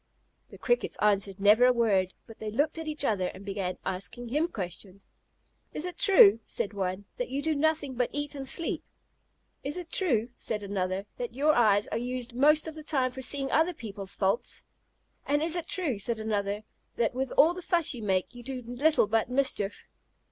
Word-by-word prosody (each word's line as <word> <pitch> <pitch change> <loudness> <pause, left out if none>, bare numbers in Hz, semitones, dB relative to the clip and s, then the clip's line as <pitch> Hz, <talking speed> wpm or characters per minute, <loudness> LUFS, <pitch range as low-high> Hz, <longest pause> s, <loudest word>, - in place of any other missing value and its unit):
The - - -12
Crickets 485 - 0
answered 200 -2 +1
never 210 +4 +5
a 250 - +6
word, 200 -6 +1
but 225 - -14
they 220 - -4
looked 290 +9 0
at 320 - -5
each 300 -2 -1
other 190 -6 +1
and 190 +2 -9
began 195 -2 -3
asking 195 +6 -3
him 300 +7 +1
questions. 190 - -7 0.6
"Is 310 - -2
it 360 - -6
true," 225 - +7
said 205 - -3
one, 190 0 -3
"that - - -3
you 270 - -2
do 320 - +1
nothing 305 -2 0
but 245 -1 0
eat 290 0 -3
and 275 -2 -5
sleep?" 335 +4 0 0.8
"Is 285 +5 -3
it 350 -2 -7
true," 245 - +1
said 210 -2 -3
another, 195 -1 -2
"that 240 -1 -5
your 300 +3 +3
eyes 210 -5 +4
are - - -2
used 250 0 -4
most 300 +5 +4
of 320 - -5
the 310 - -7
time 265 -4 0
for 260 +1 -7
seeing 270 +1 +2
other 325 +3 +2
people's 200 -5 -7
faults?" 205 +5 -1 0.6
"And 290 +2 +2
is 330 +1 0
it 340 -2 -3
true," 300 - -1
said 225 +2 -2
another, 210 -1 -2 0.3
"that 230 0 0
with 260 +1 -2
all 320 +4 +6
the 365 - -7
fuss 340 -3 +2
you 240 - -7
make, 190 0 0
you 245 - -10
do 255 0 -6
little 270 +4 +2
but 220 +2 0
mischief?" 250 -6 0
245 Hz, 200 wpm, -28 LUFS, 205-295 Hz, 0.8 s, true